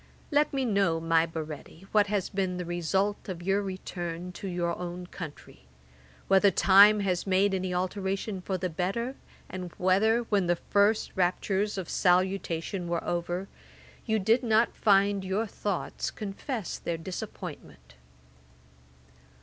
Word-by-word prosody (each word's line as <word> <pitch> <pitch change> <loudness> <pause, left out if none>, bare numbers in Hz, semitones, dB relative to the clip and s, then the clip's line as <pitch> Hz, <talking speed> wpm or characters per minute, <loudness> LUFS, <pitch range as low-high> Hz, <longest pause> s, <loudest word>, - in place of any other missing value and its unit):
Let 295 +1 +3
me 270 -2 0
know, 200 -7 +2
my 165 0 +2
Baretti, 160 +2 -7
what 210 -1 +4
has 200 -2 0
been 190 -2 -2
the 180 - -4
result 190 +5 -1
of 175 -2 -5
your 195 +2 +2
return 180 -2 -5
to 180 +3 -7
your 175 -2 -1
own 180 0 -6
country: 150 - -10 0.6
whether 195 +1 +5
time 200 +3 +6
has 185 -1 -1
made 195 +1 +3
any 185 -1 -1
alteration 190 +2 -2
for 190 +1 -2
the 185 0 -2
better, 195 +10 -2 0.3
and 180 -2 -6
whether, 205 +6 +3
when 205 -6 0
the 175 - +3
first 205 +4 +2
raptures 195 +2 0
of 185 -3 -4
salutation 180 -1 +1
were 170 -1 -1
over, 175 +2 -2 0.6
you 220 -1 +2
did 220 +4 +3
not 230 -1 +2
find 200 -1 +3
your 190 +4 -1
thoughts 200 -3 -3
confessed 210 - -5
their 170 - -2
disappointment. 165 - -8
190 Hz, 140 wpm, -28 LUFS, 175-205 Hz, 0.6 s, time